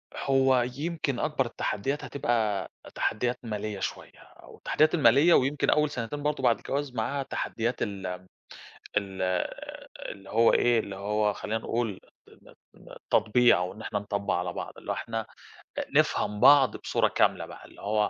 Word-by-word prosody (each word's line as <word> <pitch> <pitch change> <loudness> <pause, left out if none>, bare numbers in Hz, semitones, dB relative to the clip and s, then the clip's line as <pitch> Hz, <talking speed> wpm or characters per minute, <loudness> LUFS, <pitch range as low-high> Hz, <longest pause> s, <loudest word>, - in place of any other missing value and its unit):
هو 135 -2 +3 0.2
يمكن 155 -4 -2
أكبر 150 -3 0
التحديات 130 +4 -2
هتبقى 115 -7 -1 0.3
تحديات 120 +3 -1
مالية 105 -2 -4
شوية، - - -5
أو - - -16
التحديات 155 0 +2
المالية 145 +3 +5
ويمكن 135 +1 +2
أول 150 0 +3
سنتين 145 +1 -5
برضه 150 -2 -1
بعد 120 -2 +4
الجواز 140 -1 -3
معاها 135 +5 -1
تحديات 120 -2 -3
ال 100 -2 -3 0.2
م 95 - -22 0.7
ال 95 -2 -1 0.9
اللي 95 -1 -10
هو 115 +1 +4
إيه، 120 -1 +3
اللي 100 -2 -7
هو 105 +1 0
خلينا 110 +2 -3
نقول 115 -3 -2 0.3
ن - - -18 0.2
ن - - -14
تطبيع 120 +1 +4
أو 90 +1 -2
إن 105 - -13
إحنا 105 -1 -2
نطبَّع 100 0 -2
على 90 0 -3
بعض، - - -6
اللي - - -7
هو - - +1
إحنا 115 -1 -4 0.7
نفهم 105 0 +2
بعض 135 +1 +6
بصورة - - +1
كاملة - - +1
بقى، - - -12
اللي - - -16
هو 105 +1 +1
115 Hz, 160 wpm, -28 LUFS, 105-135 Hz, 0.9 s, بعض